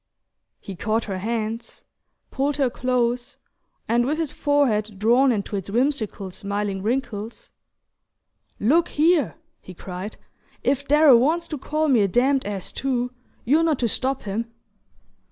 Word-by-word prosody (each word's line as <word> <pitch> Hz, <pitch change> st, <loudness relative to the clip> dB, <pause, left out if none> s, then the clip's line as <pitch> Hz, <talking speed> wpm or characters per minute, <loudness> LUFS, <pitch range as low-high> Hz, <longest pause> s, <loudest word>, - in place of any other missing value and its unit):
He 195 Hz, -, -8 dB
caught 220 Hz, +5 st, 0 dB
her 190 Hz, -3 st, -4 dB
hands, 225 Hz, +2 st, -4 dB, 0.5 s
pulled 280 Hz, +1 st, 0 dB
her 270 Hz, -4 st, +1 dB
close, 245 Hz, -1 st, -1 dB, 0.5 s
and, 235 Hz, +2 st, +3 dB
with 290 Hz, +5 st, 0 dB
his 325 Hz, -4 st, -1 dB
forehead 225 Hz, -8 st, +1 dB
drawn 240 Hz, +6 st, +4 dB
into 205 Hz, -2 st, -2 dB
its 195 Hz, -1 st, -4 dB
whimsical 225 Hz, -5 st, -1 dB
smiling 200 Hz, 0 st, -3 dB
wrinkles, 230 Hz, -, -3 dB, 1.1 s
"Look 310 Hz, +11 st, +3 dB
here," 320 Hz, +1 st, +2 dB, 0.3 s
he 185 Hz, -, -11 dB
cried, 185 Hz, +4 st, -7 dB, 0.5 s
"if 280 Hz, +1 st, 0 dB
Darrow 295 Hz, -3 st, +7 dB
wants 325 Hz, +7 st, +1 dB
to 305 Hz, -, -3 dB
call 305 Hz, +3 st, -1 dB
me 255 Hz, -6 st, +4 dB
a 200 Hz, -, +3 dB
damned 260 Hz, +5 st, +2 dB
ass 200 Hz, -3 st, -4 dB
too 250 Hz, -2 st, -1 dB, 0.3 s
you're 295 Hz, +7 st, +4 dB
not 320 Hz, -4 st, +2 dB
to 240 Hz, -, 0 dB
stop 265 Hz, +4 st, -2 dB
him!" 225 Hz, +3 st, -3 dB
240 Hz, 140 wpm, -23 LUFS, 210-280 Hz, 1.1 s, Darrow